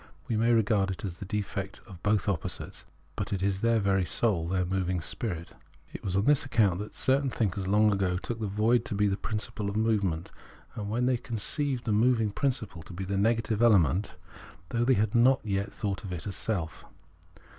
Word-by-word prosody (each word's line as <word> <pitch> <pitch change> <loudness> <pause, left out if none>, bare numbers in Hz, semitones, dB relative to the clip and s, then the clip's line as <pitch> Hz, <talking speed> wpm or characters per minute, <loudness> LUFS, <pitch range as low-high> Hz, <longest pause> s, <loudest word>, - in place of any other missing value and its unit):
We 115 - -1
may 115 +2 +3
regard 105 -3 +3
it 95 +2 -4
as 90 -2 -6
the - - -6
defect 100 -1 -3
of 95 -6 -12
both 105 -1 +1
opposites, 95 -6 -3 0.3
but - - -3
it 95 -2 -1
is 100 -1 0
their 115 -1 +3
very 100 -2 +2
soul, 90 -1 +1
their 90 0 0
moving 90 -1 -1
spirit. 85 0 -4 0.4
It - - -8
was 95 -1 -2
on 100 +2 +2
this 145 -1 +4
accoimt 105 -9 +2
that 105 +1 -7
certain 135 +1 +2
thinkers 100 -5 -1
long 105 +2 +4
ago 95 -2 0
took 115 +4 -5
the 110 - -2
void 110 +5 +2
to 105 - -3
be 105 +1 +2
the 100 -1 +2
principle 105 -1 -3
of 100 - -5
movement, 100 -7 0 0.4
when 110 +4 -2
they 125 -1 +2
conceived 125 +4 -2
the 110 - 0
moving 115 0 +3
prin 140 +7 +1
ciple 100 -9 -8
to - - -10
be 95 +2 -5
the 100 +1 -2
negative 110 +1 +1
element, 100 - +4 0.6
though 120 0 0
they 130 +1 +4
had 105 0 +1
not 130 +3 +5
as 105 - -3
yet 100 +1 -1
thought 100 0 -3
of 95 - -6
it 90 -2 -5
as 100 -3 -3
self. 85 -1 -3
105 Hz, 210 wpm, -29 LUFS, 95-115 Hz, 0.6 s, not